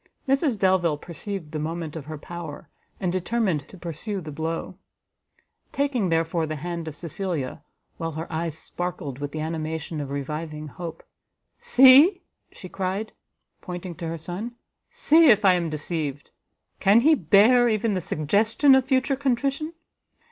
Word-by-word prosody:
Mrs 270 -2 +2
Delvile 185 -5 +2
perceived 175 0 -6
the 155 - -3
moment 160 0 -4
of 155 -4 -6
her 155 +1 -6
power, 165 -1 -8 0.3
and 180 -3 -1
determined 185 -5 -1
to 190 - -13
pursue 175 +5 -4
the 155 -4 -8
blow: 165 +4 -4 1.0
taking, 270 -9 0
therefore, 165 0 0
the 155 - -3
hand 170 +2 -5
of 155 - -5
Cecilia, 170 -3 -4 0.4
while 165 -1 -4
her 160 +2 -4
eyes 160 -1 -2
sparkled 175 -8 -5
with 145 0 -4
the 155 - -4
animation 160 0 -4
of 140 - -5
reviving 150 +2 -5
hope, 165 0 -8 0.6
"See," 270 +9 +7 0.3
she 185 - -10
cried, 190 +4 -3 0.5
pointing 180 0 -6
to 170 -2 -5
her 165 +1 -3
son, 185 +9 -6 0.3
"see 320 +2 +5
if 210 -2 +5
I 190 - +7
am 175 -2 0
deceived! 150 -2 -4 0.5
can 200 +4 +5
he 310 +5 +5
bear 235 - +5
even 215 0 +1
the 185 - -1
suggestion 215 - +3
of 265 -1 +4
future 265 +1 +1
contrition! 275 +3 -1
175 Hz, 150 wpm, -25 LUFS, 155-220 Hz, 1.0 s, See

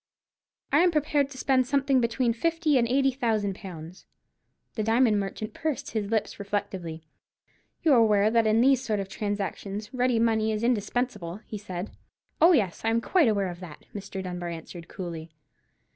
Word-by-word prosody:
"I 290 - +5
am 360 +1 +5
prepared 295 -3 +1
to 270 - -11
spend 255 -1 +2
something 275 -1 +2
between 235 +1 +1
fifty 330 +4 +1
and 235 - +2
eighty 270 +2 +3
thousand 220 -6 0
pounds." 180 -2 -10 0.7
The 220 - -2
diamond 225 0 +3
merchant 200 +2 -5
pursed 310 -4 -3
up - - -14
his 210 -3 -2
lips 220 -1 -1
reflectively. 190 -5 -4 0.8
"You 315 - +5
are - - +6
aware 210 -1 +4
that 230 -1 +3
in 215 +1 +4
these 265 0 +4
sort 215 -4 -1
of 195 - -3
transactions 205 +1 -4
ready 250 -1 +1
money 220 -1 +2
is 215 +1 -2
indispensable?" 215 -5 -1
he 210 - -6
said. 185 -1 -6 0.5
"Oh, 335 +3 +8
yes, 200 - +1
I 225 - +2
am 225 +1 +2
quite 325 +5 +3
aware 200 -4 +1
of 175 -1 -8
that," 175 -5 -11
Mr. 200 -1 -6
Dunbar 180 -1 -4
answered, 165 0 -8
coolly. 170 -4 -7
220 Hz, 175 wpm, -27 LUFS, 195-255 Hz, 0.8 s, Oh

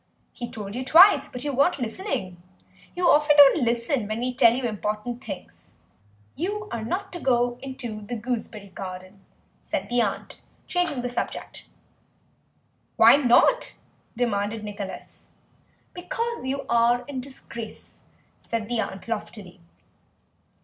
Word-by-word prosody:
"He 240 -2 -6
told 205 -2 -7
you 250 +3 -3
twice, 350 +9 +7
but 250 - -5
you 290 -1 -2
weren't 285 +6 +3
listening. 225 - -4 0.5
You 355 0 +1
often 295 0 +5
don't 285 +2 +8
listen 235 0 0
when 215 +1 -3
we 250 +2 -2
tell 245 -3 +6
you 255 +2 -2
important 215 +1 -3
things." 195 -4 -9 0.6
"You 415 +7 -3
are 230 - -3
not 380 - -3
to 350 - -5
go 245 -3 +1
into 250 -5 -5
the 210 +4 -5
gooseberry 220 -3 -5
garden," 185 +1 -8 0.4
said - - -3
the 245 0 +3
aunt, 205 -4 -3 0.2
changing 350 -8 -1
the - - -1
subject. 245 - -5 1.3
"Why - - +8
not?" 285 - +3 0.4
demanded 215 -2 -1
Nicholas. 205 -2 -8 0.6
"Because 460 - -4
you 275 +1 -2
are 235 +1 +3
in 270 -3 -4
disgrace," 235 -4 -10 0.4
said 225 -2 -4
the 240 0 -1
aunt 195 -1 -6
loftily. 210 -4 -6
240 Hz, 135 wpm, -25 LUFS, 215-280 Hz, 1.3 s, don't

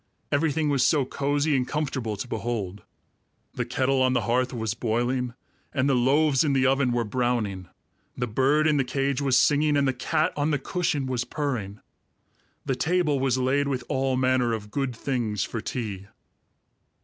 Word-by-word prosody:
Everything 155 +1 +1
was 140 -3 +2
so 145 -4 +3
cozy 145 +3 0
and 125 -1 0
comfortable 130 -8 -2
to 100 - -5
behold. 105 -6 -3 0.7
The 125 - -2
kettle 130 +2 +1
on 130 0 +3
the 120 - +2
hearth 125 +2 0
was 110 -4 -2
boiling, 120 +1 -1 0.4
and 135 -1 +2
the 140 - +3
loaves 135 +3 +3
in 145 -3 +1
the 135 0 +2
oven 135 -1 +2
were 120 0 +1
browning; 110 -5 -1 0.5
the 125 - 0
bird 135 +7 +2
in 155 -2 +3
the 135 - +2
cage 135 +1 -1
was 135 -2 +3
singing, 150 0 +3
and 140 -1 +2
the 130 - +1
cat 140 +5 0
on 145 +1 0
the 150 - +2
cushion 145 -1 -1
was 125 -2 -1
purring. 125 -10 -4 0.8
The 135 - 0
table 160 -2 +1
was 130 -1 +1
laid 135 +3 +1
with 130 -2 -2
all 130 -1 0
manner 130 -2 +2
of 105 -2 -5
good 135 -2 -2
things 115 -5 -2
for 115 - -4
tea. 105 -6 -5
130 Hz, 175 wpm, -26 LUFS, 120-140 Hz, 0.8 s, so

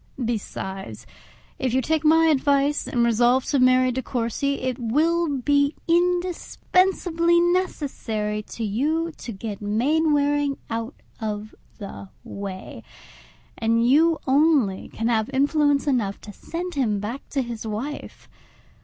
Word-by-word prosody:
Besides, 190 - -5 0.5
if 255 -2 0
you 260 - +3
take 315 +2 0
my 325 +1 +5
advice, 285 -1 +2
and 240 -4 +1
resolve 240 +3 +3
to 280 - +1
marry 255 0 +4
De 260 +1 -2
Courcy, 255 +3 -1
it 255 -1 -3
will 320 +8 +1
be 285 +3 +2
indispensably 350 0 +1
necessary 275 - -1
to 225 +2 -7
you 305 +11 0
to 240 - -7
get 205 0 -6
Mainwaring 290 +5 +1
out 230 +4 -3 0.2
of 215 -1 -4 0.2
the 200 -2 -9
way; 195 -2 -7 0.8
and 230 +1 +2
you 320 +5 +4
only 270 -8 +2
can 225 - -3
have 225 -1 +1
influence 285 +1 +2
enough 235 -9 0
to 205 - -10
send 350 - -6
him 225 -8 0
back 230 +7 -6
to 275 -3 -1
his 235 -2 -6
wife. 245 +8 -6
260 Hz, 125 wpm, -24 LUFS, 225-305 Hz, 0.8 s, my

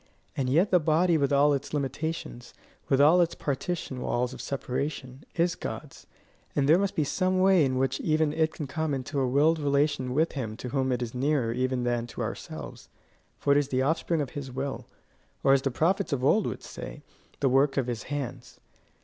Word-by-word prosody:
And 130 -2 -1
yet 170 +9 +3
the 180 - +6
body 165 +2 +3
with 140 -3 +1
all 145 +1 +4
its 140 +2 -3
limitations, 140 -3 -4 0.3
with 135 - +3
all 160 +5 +6
its 170 - +1
partition 140 -2 -3
walls 125 +1 -1
of - - -8
separation, 135 0 -4
is 170 0 +2
God's, - - -7 0.5
and 140 -1 +2
there 160 +4 +6
must 200 -1 -1
be 155 - +2
some 185 +5 0
way 190 -3 +5
in 130 -2 0
which 135 0 0
even 155 -1 +1
it 160 0 +1
can 150 - -6
come 150 +1 -2
into 135 +2 -3
a 130 - +1
willed 150 +5 +3
relation 140 -3 +1
with 160 +3 +2
him 110 -6 -5
to 125 - -6
whom 130 0 0
it 125 -1 0
is 115 - -6
nearer 130 -3 +1
even 130 0 -1
than 120 -1 -1
to - - -7
ourselves, - - -7 0.5
for 140 - 0
it 145 - +5
is 145 - -1
the 130 -1 0
offspring 160 +2 0
of 140 - -4
his 140 -3 -6
will, 135 +2 -4 0.6
or 135 - +5
as 135 - +4
the 135 - 0
prophets 180 +8 0
of 135 -3 -1
old 210 +8 +3
would - - -5
say - - -8 0.4
the 140 - +2
work 135 +2 +3
of 135 - +2
his 120 -2 -3
hands. 130 -4 -5
140 Hz, 205 wpm, -27 LUFS, 130-155 Hz, 0.6 s, the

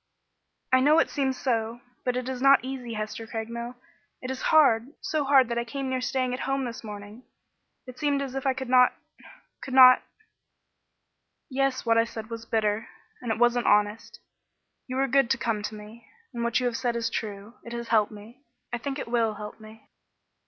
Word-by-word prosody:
"I 260 - +7
know 295 +4 +5
it 330 - +3
seems 265 -2 -1
so, 230 -2 -1 0.3
but 250 -1 0
it 250 0 -3
is 260 -1 -4
not 275 0 +6
easy, 255 -3 -5
Hester 215 +1 -5
Craigmile. 235 +2 -5 0.4
It 255 - -5
is 260 - -5
hard 260 -7 +5
so 310 -2 -1
hard 270 -2 +5
that 235 0 -1
I - - -1
came 265 +2 -4
near 255 -1 -1
staying 255 0 -1
at 250 - -3
home 270 -1 0
this 235 -1 -7
morning. 210 +1 -9 0.6
It 255 -1 -11
seemed 290 -1 +1
as 275 -2 -4
if 270 0 -3
I 265 - +2
could 265 0 -5
not 250 0 +5 0.7
could 260 - -5
not 255 -1 +9 0.8
" - - -53 0.7
"Yes, 270 -1 0
what 230 0 +4
I 230 - +3
said 225 -1 -8
was 230 0 -7
bitter, 215 0 0 0.3
and 240 -3 -3
it 220 - -1
wasn't 240 0 +2
honest. 210 +2 +1 0.7
You 255 - -5
were 270 +1 +1
good 270 -1 +3
to 265 - +2
come 225 -3 -1
to 210 +1 -5
me 215 +2 -12 0.3
and 235 -1 -3
what 235 +1 +1
you 250 - -2
have 240 -2 0
said 245 -2 -1
is 230 -1 -1
true. 205 0 -5
It 235 - -9
has 235 0 -5
helped 215 -2 +3
me; 215 +5 -13 0.3
I 240 - -1
think 275 +3 -4
it - - -5
will 230 -2 +1
help 210 +1 -8
me." 220 0 -15
240 Hz, 205 wpm, -26 LUFS, 225-260 Hz, 0.8 s, not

